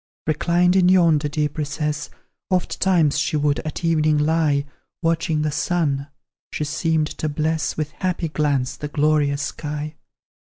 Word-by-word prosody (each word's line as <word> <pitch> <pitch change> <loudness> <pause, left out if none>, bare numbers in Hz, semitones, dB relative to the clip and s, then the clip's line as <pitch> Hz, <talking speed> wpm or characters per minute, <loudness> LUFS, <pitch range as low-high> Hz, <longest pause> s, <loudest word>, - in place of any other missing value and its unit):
Reclined 175 +3 +2
in 180 -1 +5
yonder 165 -5 +4
deep 150 0 -2
recess, 150 0 -2 0.4
Ofttimes 180 -4 +2
she 155 +1 0
would, 145 -1 +1
at 155 +2 -5
evening, 155 -2 +3
lie 150 -2 +2 0.4
Watching 165 -2 +1
the 155 - 0
sun; 145 -4 0 0.4
she - - -2
seemed 155 +1 0
to 155 - -1
bless 155 +1 -1
With 155 -1 -2
happy 175 +1 -2
glance 145 -4 0
the 150 - -5
glorious 145 -1 +1
sky. 150 0 -4
155 Hz, 135 wpm, -22 LUFS, 150-165 Hz, 0.4 s, in